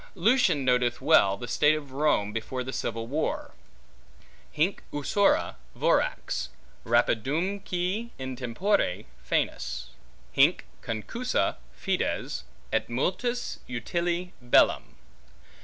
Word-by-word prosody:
Lucan 195 - +3
noteth 125 -1 +2
well 130 -10 +5
the 120 - -7
state 145 +4 +4
of 145 -3 -7
Rome 135 -7 +1
before 125 +3 -3
the 130 +1 -6
Civil 115 0 -3
War, 145 +7 -2 1.0
Hinc 165 +6 0
usura 145 +8 +2 0.2
vorax, - - +1 0.3
rapidumque 180 - 0
in 130 -1 -5
tempore 125 - 0 0.2
foenus, - - -2 0.4
Hinc - - +4 0.2
concussa 170 - -1
fides, - - -2 0.3
et - - +1
multis 245 0 -1
utile 170 +8 -2
bellum. 120 0 +3
145 Hz, 95 wpm, -27 LUFS, 120-180 Hz, 1.0 s, well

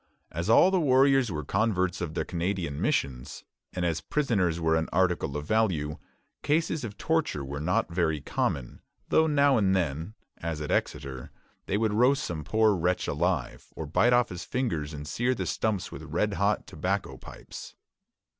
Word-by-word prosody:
As 85 +5 -3
all 180 +11 +6
the 190 - +3
warriors 135 - +4
were 75 -3 -4
converts 95 -2 0
of 80 -2 -4
the - - -1
Canadian 85 -4 -2
missions, 65 +1 -1 0.3
and 90 -1 -2
as 80 -2 0
prisoners 100 - 0
were 80 -1 +2
an 80 0 0
article 90 -6 +1
of 75 - -5
value, 90 -9 0 0.4
cases 155 -1 0
of 105 -3 -6
torture 160 - 0
were 70 +2 -5
not 85 +2 0
very 80 -3 +1
common; 65 -2 -2 0.3
though 160 - +4
now 140 -3 +4
and 95 -3 +3
then, 80 +3 -2 0.2
as 80 -2 -3
at 75 - -4
Exeter, 70 -4 -2 0.4
they 100 - +1
would 110 -1 +1
roast 130 +6 +3
some 80 -3 -4
poor 110 +6 +3
wretch 90 0 0
alive, 75 -4 -1
or 80 - -5
bite 100 +11 +3
off 120 -1 +4
his 90 -2 -6
fingers 85 - -2
and 75 -1 -7
sear 120 +10 0
the - - -3
stumps 105 -4 -1
with - - -8
red 85 +7 -1
hot 100 +1 +1
tobacco - - -2
pipes. - - -11
90 Hz, 175 wpm, -28 LUFS, 75-115 Hz, 0.4 s, all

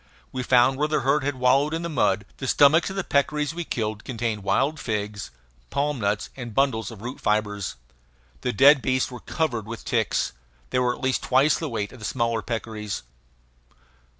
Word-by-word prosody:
We 130 - -3
found 125 +1 +4
where 150 - +2
the 155 0 0
herd 140 +3 +2
had 145 0 -1
wallowed 135 +5 +3
in 165 - -3
the - - -2
mud. 100 -10 +1
The 135 - -4
stomachs 150 +7 +5
of 190 - -6
the 195 - -1
peccaries 150 +1 0
we 175 +1 -3
killed 110 -7 -3
contained 115 -4 -3
wild 135 +10 +1
figs, 105 -3 -3 0.4
palm 145 0 -1
nuts, 105 0 -1
and 120 -5 -7
bundles 135 -5 +1
of 110 -3 -11
root 125 +3 -6
fibres. 105 -2 0 0.7
The - - 0
dead 140 +2 +6
beasts 130 0 0
were 125 - -7
covered 120 -10 -2
with 115 -1 -7
ticks. - - 0 0.4
They 125 - +2
were 125 -1 +1
at - - -14
least 130 0 +1
twice 135 +1 +3
the - - -3
weight 105 -3 -3
of 130 - -12
the 105 - -6
smaller 115 +2 0
peccaries. 110 - -4
125 Hz, 190 wpm, -25 LUFS, 110-140 Hz, 0.7 s, dead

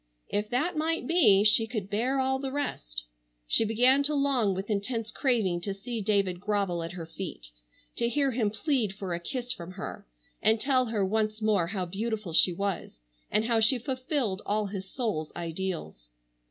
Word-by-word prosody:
If 210 +1 -1
that 310 +9 0
might 320 +2 0
be 225 - +5
she 215 +1 +5
could 215 -4 -4
bear 240 +7 0
all 265 0 +1
the 270 -1 -3
rest. - - -3 0.4
She 145 - +4
began 245 +5 +4
to 295 +1 0
long 260 -8 +2
with 190 +2 -4
intense 220 +2 -2
craving 215 -10 +1
to 195 +1 -3
see 225 +3 -4
David 195 -3 +1
grovel 200 -4 0
at 165 +1 -5
her 170 -2 -6
feet, 160 - -7 0.5
to 235 0 +1
hear 280 +1 +2
him 225 -4 +1
plead 225 -2 0
for 195 -3 -4
a 170 - -2
kiss 245 +8 -3
from 185 -6 -6
her, 190 - -7 0.3
and 220 +1 +4
tell 255 0 +2
her 215 -3 0
once 215 +2 0
more 210 -6 +2
how 185 0 -2
beautiful 210 0 -3
she 180 - +5
was, 195 +1 -3 0.3
and 215 - +2
how 230 -1 +2
she 225 +4 +4
fulfilled 255 -5 -1
all 210 +1 0
his 195 -1 -6
soul's 210 - -2
ideals. 165 - -4
215 Hz, 180 wpm, -28 LUFS, 190-250 Hz, 0.5 s, be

